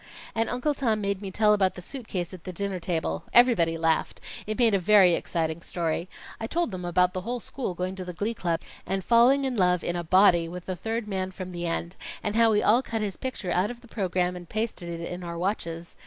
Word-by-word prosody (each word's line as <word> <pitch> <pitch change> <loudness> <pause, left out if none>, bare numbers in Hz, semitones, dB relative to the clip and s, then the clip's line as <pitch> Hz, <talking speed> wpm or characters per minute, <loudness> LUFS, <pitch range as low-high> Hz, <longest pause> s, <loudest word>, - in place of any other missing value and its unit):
"And 225 0 0
Uncle 250 +5 0
Tom 230 -6 0
made 200 -1 -2
me 195 - -5
tell 210 +2 +3
about 195 -3 +2
the 180 - -8
suit 255 +3 -7
case 175 -2 -3
at 180 -3 -10
the 185 - -5
dinner 195 0 -3
table. 160 - -2
Everybody 225 -10 +5
laughed. 160 -1 0 0.3
It 215 - -2
made 235 -4 +4
a 195 - +3
very 185 -1 +6
exciting 165 -1 -1
story. 170 +1 -2 0.3
I 225 - -3
told 340 -1 0
them 185 -1 -5
about 180 +1 +2
the 185 - -3
whole 240 +5 -3
school 235 -5 -4
going 180 +1 -2
to 185 - -4
the 180 - -5
Glee 205 +6 -2
Club, 170 -6 -1 0.3
and 190 0 -1
falling 245 +6 +5
in 260 -2 -1
love 180 -3 +2
in 175 - -1
a 175 - -2
body 175 -1 +5
with 180 +1 -8
the 185 - -3
third 225 +4 -3
man 190 -2 -2
from 185 0 -7
the 175 -1 -4
end, 170 +2 -3 0.3
and 210 0 -2
how 230 0 +5
we 210 -1 +2
all 235 +4 +5
cut 225 -4 -3
his 200 -3 -2
picture 255 -8 -4
out 180 +4 +2
of 240 0 -8
the 245 - -16
program 180 -4 -1
and 175 -1 -10
pasted 215 -5 -3
it 170 0 -5
in 180 0 -6
our 170 -1 -5
watches. 170 -3 -3
185 Hz, 245 wpm, -27 LUFS, 175-220 Hz, 0.3 s, very